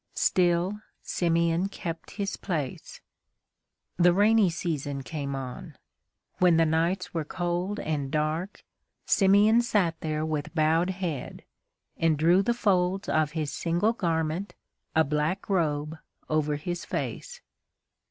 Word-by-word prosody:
Still 180 +3 +2 0.2
Simeon 170 +1 +1
kept 165 -4 -6
his 200 -1 -2
place. 155 -9 -5 1.0
The 175 0 +5
rainy 210 0 +4
season 145 -5 -3
came 140 -2 -4
on. 130 -2 -7 0.6
When 180 -2 +5
the 165 - +4
nights 165 +4 0
were 165 -2 -1
cold 175 +5 -2
and 145 -3 -2
dark, 155 +6 -2 0.4
Simeon 205 +4 +5
sat 205 -8 +1
there 155 -1 -2
with 155 +1 -3
bowed 160 +3 +2
head, 180 -8 -4 0.5
and 165 -2 +2
drew 170 +5 +4
the 235 +4 0
folds 190 -3 +1
of 155 -1 +1
his 155 -3 -2
single 175 +7 +1
garment, 165 -1 -2 0.4
a 160 - +5
black 150 +6 -1
robe, 155 -4 -1 0.3
over 150 -1 0
his 175 +4 -4
face. 485 0 -5
170 Hz, 125 wpm, -27 LUFS, 155-190 Hz, 1.0 s, The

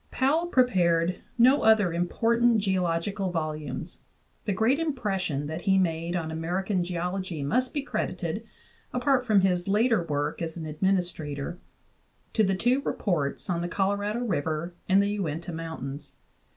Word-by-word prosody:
Powell 305 +6 +1
prepared 180 - +2 0.2
no 255 +4 +6
other 215 -6 +4
important 230 +7 +2
geologi 185 -1 0
cal 195 -2 -1
volumes; 155 -5 -4 0.5
the - - 0
great 225 +9 +2
impression 195 - -1
that 160 +3 -4
he 195 -1 +3
made 170 -1 0
on 160 -2 -2
American 180 +4 -1
geology 180 -2 -3
must 250 - +1
be 290 - -2
credited - - -3 0.5
apart 255 0 +2
from 210 -3 +5
his 180 -1 +1
later 220 +1 +3
work 150 0 -2
as 165 0 -4
an 160 - -5
administrator 165 -2 -1 0.7
to 220 - +3
the 195 -1 +2
two 245 +8 +2
reports 160 - -1
on 170 -2 -1
the 175 - -2
Colorado 205 +5 0
River 165 -5 -2 0.2
and 195 +1 +5
the 200 - 0
Uinta 170 0 -3
Mountains. 150 -4 -6
185 Hz, 145 wpm, -27 LUFS, 165-220 Hz, 0.7 s, no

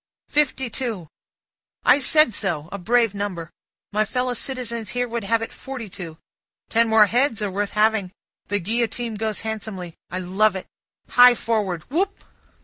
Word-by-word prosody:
"Fifty 270 -3 +1
two." 230 -9 -4 0.8
"I - - +6
said 305 -2 +5
so! 170 -7 -1
A 200 - -5
brave 230 +2 +2
number! 190 -5 -4 0.4
My 215 +1 +3
fellow 250 +3 -1
citizen 245 -2 -4
here 245 +4 -2
would 235 -1 -4
have 225 +2 +1
it - - -7
forty 260 -6 -7
two; 170 -4 -8 0.5
ten 230 0 +3
more 220 -1 +7
heads 240 +1 +1
are 205 - -2
worth 200 +1 -2
having. 215 -3 +2 0.4
The 205 - 0
Guillotine 230 +4 -2
goes 215 0 -3
handsomely. 210 -5 -5 0.2
I 180 - -4
love 190 +3 +2
it. 190 - -5 0.4
Hi 245 0 +7
forward. 205 -9 -1
Whoop!" 385 +6 -1
220 Hz, 155 wpm, -23 LUFS, 195-245 Hz, 0.8 s, more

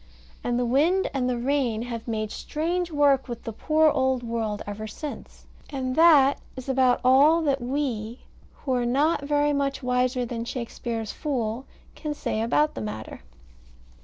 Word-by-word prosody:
And 240 0 0
the 245 - +1
wind 315 +10 +2
and 255 -2 0
the 245 - -1
rain 245 -3 0
have 235 -1 -6
made 215 -2 -2
strange 345 +3 -2
work 285 -4 +3
with 240 -2 -6
the 225 - -5
poor 310 +6 +3
old 260 -2 +1
world 225 -3 -3
ever 205 +1 -6
since. 290 +7 -8 0.2
And 260 -3 -3
that 300 -4 +6 0.2
is 260 0 -8
about 260 -2 +3
all 290 +6 +5
that 280 -3 +1
we, 240 -3 -3 0.4
who 270 - -2
are 245 -1 +1
not 285 +6 +2
very 290 +1 +1
much 275 -1 -1
wiser 250 0 +1
than 230 -1 -4
Shakespeare's 235 -2 -4
fool, 250 -4 -3 0.3
can 300 -1 -5
say 220 - -2
about 295 +7 +2
the - - -6
matter. 110 0 -6
255 Hz, 160 wpm, -25 LUFS, 235-290 Hz, 0.4 s, that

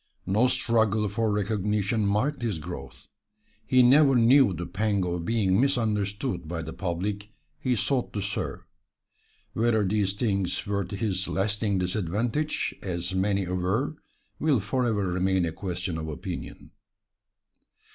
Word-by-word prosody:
No 105 +7 +3
struggle 110 -4 +2
for 110 +1 0
recognition 105 +1 0
marked 125 +8 0
his 110 -7 -1
growth. 70 -5 -8 0.6
He 130 -1 +5
never 135 +2 +6
knew 125 0 +6
the 85 0 -4
pang 100 0 0
of 85 -1 -3
being 105 -2 +2
misunderstood 110 - 0
by 85 0 -4
the 80 0 -6
public 100 +4 -3 0.3
he 125 -2 +1
sought 125 +3 0
to 105 - -2
serve. 100 +1 -3 0.9
Whether 110 -2 +2
these 100 -1 +1
things 100 -4 -1
were 100 -1 -1
to 100 - -6
his 95 -2 -1
lasting 105 0 0
disadvantage, 110 - -1
as 90 -1 -3
many 100 +1 +1
aver, 95 - -1 0.4
will 150 -5 +3
forever 110 -1 0
remain 90 0 +1
a 80 - -2
question 90 -1 -4
of 80 - -5
opinion. 75 -4 -7
100 Hz, 135 wpm, -27 LUFS, 95-115 Hz, 0.9 s, never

